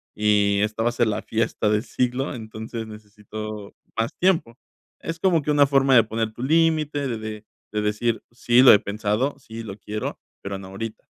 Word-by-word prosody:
y 105 -1 +3
esta 110 +1 -1
va 120 - +3
a - - -3
ser 120 -1 +2
la 105 - -1
fiesta 110 -1 -1
de 105 0 +2
siglo, 125 +2 -1
entonces 110 0 -6
necesito 105 0 -8 0.2
más 115 0 0
tiempo". 165 -11 +1 0.4
Es 165 0 -5
como 170 -3 +3
que 150 - -1
una 145 -1 +5
forma 135 -1 +4
de 115 - +7
poner 110 0 -3
tu 120 - -7
límite 155 -1 +2
de 120 -3 -3
de 110 -1 -7 0.3
de 105 0 -1
decir: 105 +2 -1
"Sí 120 +1 +3
lo 130 - +9
he 105 - +6
pensado, 105 +7 -1
sí 115 -3 -9
lo 100 -3 -8
quiero, 105 +1 -5 0.2
pero 100 0 -5
no 95 - -10
ahorita". 110 +3 -7
110 Hz, 195 wpm, -23 LUFS, 105-130 Hz, 0.4 s, lo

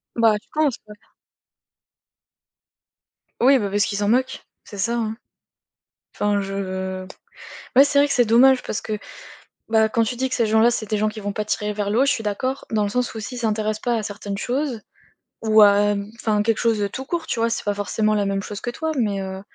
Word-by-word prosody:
Bah, 225 -2 +4
je - - -33
pense, 300 -5 +1
ouais. 210 - -11 2.5
Oui, 270 +2 +6
bah, 200 -2 -2
parce 205 0 +1
qu'ils 200 - -3
s'en 205 0 0
moquent. 255 +2 0 0.2
C'est 205 - -11
ça, 230 +5 0
hein. 220 -1 -2 1.0
Enfin 205 0 +1
je 190 -1 -4 0.7
Ouais, 270 - +9
c'est 285 0 +2
vrai 290 - +4
que - - -1
c'est 245 - +4
dommage 255 +4 +5
parce - - -3
que, 215 -1 -3 0.7
bah, 220 -1 +3
quand 230 +1 +1
tu 235 +2 -2
dis 260 +1 -1
que - - -3
ces 230 -3 +1
gens-là, 220 +2 +4
c'est 220 -3 -3
des 215 - +1
gens 215 +1 +1
qui 215 0 -7
vont 205 0 -3
pas 210 - -3
tirer 210 0 -1
vers 205 -1 -3
le 220 +4 +2
haut, 270 - +5
je - - +3
suis 225 - -3
d'accord 255 +6 -2
dans 215 -2 +1
le - - -1
sens 250 +3 -1
où 220 - -5
s'ils 250 +4 -6
s'intéressent 215 -2 -1
pas 240 -1 0
à - - -3
certaines 205 -1 -5
choses 250 0 -2 0.6
ou, 220 -1 +6
hem, 205 0 +3
enfin 215 -2 0
quelque 225 -1 +1
chose 225 -2 +1
de 200 - 0
tout 260 - -6
court, 335 +1 -3
tu - - -2
vois? 230 - +2
C'est 230 - -2
pas 205 - +1
forcément 215 +1 0
la 205 -1 +1
même 195 0 -1
chose 205 -1 -7
que 240 - -3
toi, 320 +5 -3
mais 205 -5 0
heu, 190 0 -6
215 Hz, 225 wpm, -22 LUFS, 205-240 Hz, 2.5 s, Ouais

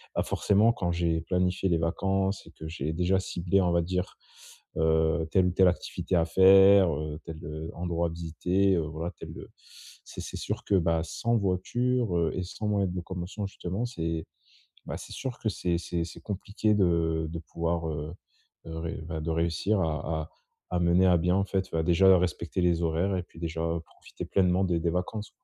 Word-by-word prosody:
ah, - - +2
forcément 105 +3 +3
quand 85 -6 -2
j'ai 85 -1 0
planifié 90 +2 0
les 85 - +3
vacances 95 +4 0
et - - -13
que 80 - -9
j'ai 80 -1 -3
déjà 90 +3 +2
ciblé 90 0 0
on 90 -1 +2
va 85 0 +3
dire, 90 +2 -2 0.6
heu, 80 0 +2
telle 95 -1 +4
ou - - +1
telle 95 +1 +5
activité 90 0 -3
à 85 -1 +3
faire, 95 +1 +7
heu, 75 0 -4
tel 80 - -7
heu, 80 +1 -6
endroit 85 0 -1
à - - -7
visiter, 90 +4 +1
heu, 85 - +1
voilà 80 +2 -4
tel, - - -8
heu - - -10 0.6
c'est - - -10
c'est - - -7
sûr - - -4
que 100 - +2
bah, 85 -3 +2
sans 115 +8 0
voiture, 110 +2 0
heu 85 -1 +2
et 90 - -2
sans 100 +4 -5
moyens 100 -3 +1
de - - -6
locomotion 90 +3 -5
justement 95 +4 -4
c'est, 80 -8 -3 0.6
bah, - - -4
c'est - - -10
sûr 130 -2 -5
que - - -3
c'est 90 -3 -1
c'est 85 0 -2
c'est 85 - -10
compliqué 105 +1 -1
de 85 -4 +1
de 85 0 -5
pouvoir, 85 0 -2
heu 75 +2 -4 0.5
heu, 80 0 -6
ré 80 0 -4
bah, 80 -2 -4
de 80 - -3
réussir 85 +5 +1
à 80 -1 -1
à 75 - -12 0.5
à - - +2
mener 85 +2 +4
à 90 - +5
bien 90 +2 +2
en 100 - +1
fait, 95 -1 -2
bah, 80 0 0
déjà 95 +3 +6
respecter 85 0 -2
les 85 -1 +2
horaires 85 +4 +1
et 90 - -2
puis 85 - -16
déjà, 80 -1 -3
heu, 85 0 -1
profiter 80 - -10
pleinement 95 0 +2
des 85 -2 +1
des 85 - +1
vacances. 100 +4 -3
85 Hz, 205 wpm, -28 LUFS, 80-95 Hz, 0.6 s, faire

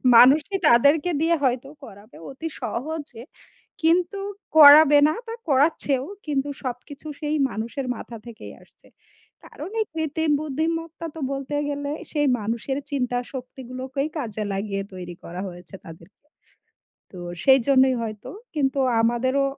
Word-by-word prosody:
মানুষই 295 - +6
তাদেরকে 285 +7 +4
দিয়ে 335 +1 +3
হয়তো 255 0 0 0.2
করাবে 210 -1 -13
অতি 275 +4 -6
সহজে 290 -2 -5 0.6
কিন্তু 350 +4 +2 0.4
করাবে 295 0 +9
না 310 - +1
বা 455 - -5 0.2
করাচ্ছেও। 275 -1 +2 0.2
কিন্তু 285 -2 -1
সবকিছু 265 +4 -7
সেই 300 +1 -1
মানুষের 230 +5 -4
মাথা 230 +1 -9
থেকেই 235 -2 -10
আসছে। - - -25 0.6
কারণ - - -9
এই 435 - 0
কৃত্রিম 320 0 -1
বুদ্ধিমত্তা 325 +3 -3
তো - - -7
বলতে 275 +1 -4
গেলে 285 0 -3 0.2
সেই 295 -2 +1
মানুষের 230 +5 -3
চিন্তা 250 -3 -1 0.2
শক্তিগুলোকেই 260 +2 -5
কাজে 220 -6 -3
লাগিয়ে 195 0 -3
তৈরি 180 -1 -7
করা 175 +2 -7
হয়েছে 175 +1 -11
তাদেরকে। 165 - -15 0.9
তো 185 - -11 0.3
সেইজন্যই 265 0 +5
হয়তো, 215 -2 -6 0.3
কিন্তু 275 -2 0 0.2
আমাদেরও 255 +4 +1
270 Hz, 125 wpm, -23 LUFS, 235-300 Hz, 0.9 s, করাবে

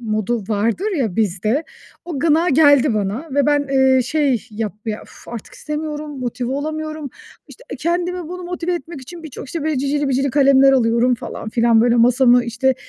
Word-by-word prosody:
modu 215 0 -1
vardır 230 - 0
ya 220 -9 -1
bizde, 215 - 0 0.4
o 335 -5 -5
gına 330 +3 +3
geldi 285 -4 +5
bana 210 +9 -2
ve 285 -1 +2
ben, 290 -1 +2
eee, 265 -1 +4
şey, 265 -4 0
yap 215 -1 -3
ya, 215 -1 -3
uf, - - -16
artık 235 -3 -8
istemiyorum, 300 -1 -5
motive 250 0 -3
olamıyorum. 310 0 -4 0.4
İşte - - -14 0.2
kendimi, 350 0 -2
bunu, 360 +1 -7
motive 355 0 -3
etmek 335 -2 -7
için 335 +6 -10
birçok, 310 -4 -8
işte, 320 +4 -5
böyle 310 -3 0
cicili 285 +1 0
bicili 270 +1 0
kalemler 275 0 +5
alıyorum 240 0 +3
falan 225 - -7
filan 230 -1 +3
böyle 240 +1 +3
masamı, 245 +1 +4
işte, 250 +3 0
270 Hz, 170 wpm, -19 LUFS, 235-310 Hz, 0.4 s, geldi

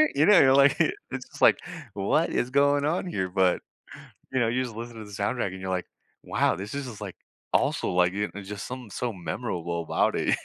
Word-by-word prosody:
You 145 - +4
know, 205 -3 +7
you're, 135 -1 +6
like, 140 0 +6
it's - - -2
just - - -13
like, - - +6 0.3
what 145 +12 +1
is 120 - 0
going 140 +1 +3
on 170 +4 0
here, 95 - -2
but, 95 -1 +2 0.7
you 130 - +2
know, 115 - +2
you 130 +2 0
just 115 -4 -7
listen 115 0 -7
to 110 - -8
the 105 - -12
soundtrack, 100 -1 -2
you're 95 0 -5
like, 90 -1 -1 0.4
wow, - - +1
this 100 +7 -7
is 140 -1 -3
just, 110 -3 -9
like, 100 -3 -6 0.4
also, - - +1
like, 90 0 +3
it's 100 -1 -4
just 105 -1 -5
something 125 -3 -7
so 120 -3 -3
memorable 85 -1 -3
about - - +1
it. - - +2
105 Hz, 210 wpm, -26 LUFS, 95-130 Hz, 0.7 s, know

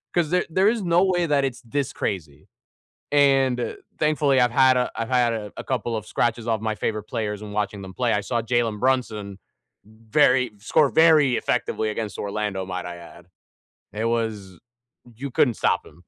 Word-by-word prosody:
'cause 170 -2 +1
there 180 - +2
there 190 +5 +2
is 225 -1 +1
no 175 +1 +3
way 175 -2 +1
that 140 -2 +2
it's 130 0 -4
this 135 +3 -3
crazy." 75 -7 -5 0.6
And 135 -4 +2 0.2
thankfully 150 -3 +2
I've 125 - +3
had 130 +1 +4
a 125 - 0
I've 115 - -4
had 125 -2 +2
a 105 -2 -5
a - - -7
couple 120 -3 -2
of 110 - -5
scratches 120 -1 -1
off 110 -2 0
my 110 0 -2
favorite 110 0 -3
players 105 -4 -4
and 105 -1 -8
watching 105 -1 -2
them 95 -1 -10
play, 120 -1 0
I 105 - +1
saw 115 +2 -2
Jalen 115 -2 0
Brunson 110 -7 -1 0.5
very 115 +4 +2
score 140 +7 +2
very 155 -6 +5
effectively 110 - -1
against 105 -1 -5
Orlando, 100 -2 -3
might 90 -1 -5
I 90 0 -6
add. 85 0 -14 0.7
It 110 - -3
was 110 -6 -2 0.6
you 135 +2 -6
couldn't 125 -1 +3
stop - - 0
him. 85 +4 -18
115 Hz, 185 wpm, -23 LUFS, 105-135 Hz, 0.7 s, very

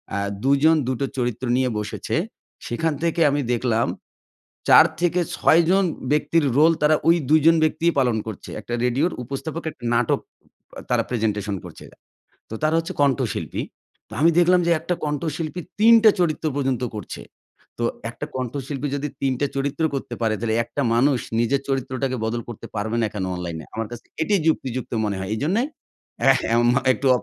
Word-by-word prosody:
আ - - 0 0.3
দুজন 140 +4 +4
দুটো 130 +1 -1
চরিত্র 125 0 -2
নিয়ে 130 -1 +1
বসেছে। 105 - -4 0.5
সেখান 160 +7 -1
থেকে 170 0 0
আমি 145 +1 0
দেখলাম 115 -1 +1 0.8
৪ 160 - +9 0.2
থেকে 175 0 +2 0.2
৬ 165 - +5
জন 195 +1 +4 0.3
ব্যক্তির 150 +2 +2
রোল 160 +3 +6
তারা 150 +1 +5
ঐ - - +7 0.2
২ 155 +1 +6
জন 165 0 +7
ব্যক্তিই 165 +2 +2
পালন 125 -4 +2
করছে। 110 -4 -7
একটা 120 - -7
রেডিওর 135 +8 +1
উপস্থাপক 145 +6 -5
একটা 125 - -20
নাটক 120 -1 +2 0.7
তারা - - +2
প্রেজেন্টেশন 105 -4 -1
করছে। - - -11 0.7
তো - - -7
তারা 155 +1 +2
হচ্ছে 165 0 -2
কণ্ঠশিল্পী। 135 -5 0 0.5
তো - - -13
আমি 165 - +6
দেখলাম 180 +1 +5
যে - - +3
একটা 180 - -2
কণ্ঠশিল্পী 155 +3 -3 0.2
৩ 225 +2 +7
টা 220 - +9
চরিত্র 165 -2 0
পর্যন্ত 135 -3 -1
করছে। 105 - -7 0.6
তো - - -1 0.3
একটা 120 - -6
কণ্ঠশিল্পী 135 +2 -3
যদি 145 +1 -2
৩ 135 -1 +1
টা 145 - +2
চরিত্র 140 +3 -1
করতে 125 -3 -5
পারে 110 -1 +1
তাইলে 110 -1 -1
একটা 140 - -4
মানুষ 130 +2 +3 0.2
নিজের 135 +4 +1
চরিত্রটাকে 130 -1 -2
বদল 120 +1 -2
করতে 120 - -8
পারবে 110 +3 -2
না 110 - +2
কেনো 95 -3 -3
অনলাইনে। 85 -3 -5
আমার 110 0 -3
কাছে 120 -1 -9 0.2
এটাই 195 +3 +2
যুক্তিযুক্ত 130 -5 -1
মনে 100 -2 -2
হয়। 95 0 -5
এজন্য 155 - 0 0.7
এহ 135 - +3 0.2
এম 120 0 +3 0.3
একটু 135 - -1
135 Hz, 170 wpm, -23 LUFS, 120-155 Hz, 0.8 s, ৪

